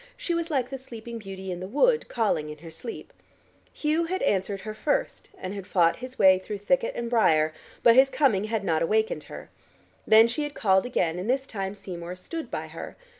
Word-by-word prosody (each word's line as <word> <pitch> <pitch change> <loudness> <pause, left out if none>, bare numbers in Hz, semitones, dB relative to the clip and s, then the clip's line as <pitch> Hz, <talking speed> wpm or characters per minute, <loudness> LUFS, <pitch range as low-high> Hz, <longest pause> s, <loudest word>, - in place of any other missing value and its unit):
She 345 - -2
was 335 0 -1
like 260 -5 0
the 270 0 -5
Sleeping 235 -2 -8
Beauty 190 -2 -7
in 175 - -4
the 185 - -5
Wood, 460 - +2
calling 205 -10 0
in 150 - -8
her 165 - -8
sleep. 225 +8 -8 0.6
Hugh 315 +2 0
had 375 +3 -2
answered 195 0 0
her 215 - -6
first 285 +7 -2
and 185 +1 -5
had 200 -2 -7
fought 170 -4 +3
his 255 +1 -9
way 190 -1 +6
through 205 +2 -6
thicket 230 +5 0
and 235 - -3
briar, 160 -10 +3 0.3
but 230 - +7
his 265 +1 +7
coming 225 -9 +2
had 220 -1 -2
not - - +1
awakened 445 0 +1
her. - - -10 0.6
Then 220 +1 +7
she 240 +6 -2
had 295 -1 -4
called 190 +1 +3
again, 175 -8 0
and 190 +6 -4
this 265 +1 +1
time 195 -4 -4
Seymour 180 -3 -7
stood 320 - -7
by - - -4
her. - - -8
220 Hz, 210 wpm, -26 LUFS, 190-270 Hz, 0.6 s, but